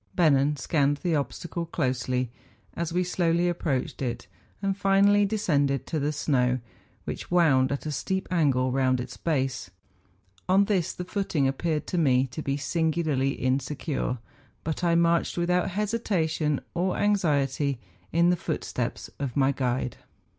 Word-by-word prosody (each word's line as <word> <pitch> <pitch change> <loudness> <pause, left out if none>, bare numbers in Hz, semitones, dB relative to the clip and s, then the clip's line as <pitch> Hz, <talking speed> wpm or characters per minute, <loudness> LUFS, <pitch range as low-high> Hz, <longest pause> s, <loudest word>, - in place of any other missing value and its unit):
Bennen 150 -3 +3
scanned 145 +1 +1
the 175 - +1
obstacle 165 +5 -3
closely 125 -5 -1 0.4
as 170 -1 -3
we 180 +2 +1
slowly 175 -1 +1
approached 155 -8 -2
it, 120 -4 -3 0.3
and 195 -1 -1
finally 200 +1 +4
descended 145 - +1
to 160 - -2
the 145 +1 0
snow, 130 -4 +1 0.5
which - - -6
wound 145 -7 +4
at 140 - -3
a 155 - -2
steep 190 +7 -2
angle 135 -7 +2
round 130 -1 +2
its 125 0 -6
base; 135 - -1 0.8
on 195 +2 +5
this 190 -5 +1
the 180 - -6
footing 180 -7 0
ap¬ 135 +1 +1
peared 155 0 -1
to 180 - -1
me 130 -4 +3
to 130 +4 -6
be 140 -1 -1
singularly 155 -3 0
insecure; 130 +1 -1 0.5
but 160 +2 -3
I 170 -1 +3
marched 170 0 +2
without 180 +1 +1
hesitation 180 - 0
or 180 +2 0
anxiety 145 -9 +1 0.3
in 170 +2 +4
the - - +3
footsteps - - -4
of 140 -2 -3
my 135 0 +4
guide. 125 -2 -2
155 Hz, 145 wpm, -27 LUFS, 135-175 Hz, 0.8 s, on